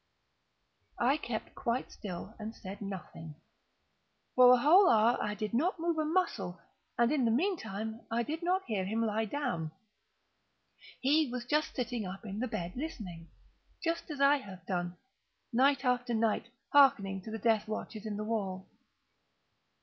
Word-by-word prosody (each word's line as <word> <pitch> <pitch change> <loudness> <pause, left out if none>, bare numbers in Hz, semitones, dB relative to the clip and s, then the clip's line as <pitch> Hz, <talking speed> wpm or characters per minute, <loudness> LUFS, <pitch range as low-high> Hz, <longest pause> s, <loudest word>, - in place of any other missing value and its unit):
I 265 +5 +3
kept 235 -7 -5
quite 235 +2 -2
still 190 +1 -7
and 220 +1 -6
said 195 +1 -8
nothing. 175 -5 -7 1.0
For 250 0 +8
a 250 - +8
whole 345 +10 +6
hour 225 +2 +5
I 210 - -2
did 215 +1 -4
not 330 +11 +1
move 335 -1 0
a 310 - +1
muscle, 310 - 0 0.4
and 235 +2 +3
in 295 -4 +2
the 230 - +3
meantime 225 - -1
I 235 +1 +1
did 315 +7 -4
not 370 +2 +1
hear 210 -5 -1
him 220 +4 0
lie 220 +1 0
down. 210 - -2 1.3
He 295 +2 +3
was 250 -1 -3
still 295 +5 +2
sitting 245 -7 -3
up 190 +4 -8
in 200 0 -5
the 255 - -1
bed 175 -6 -4
listening;—just 260 - -6
as 295 -3 -5
I 280 +1 +6
have 190 -9 -11
done, 175 -1 -2 0.6
night 265 +2 +3
after 245 -1 +1
night, 225 0 +1 0.3
hearkening 200 -9 +5
to 205 - -9
the 220 - -4
death 220 -1 +2
watches 215 0 -5
in 205 -1 -3
the 210 - -3
wall. 195 -4 -3
230 Hz, 155 wpm, -32 LUFS, 205-275 Hz, 1.3 s, For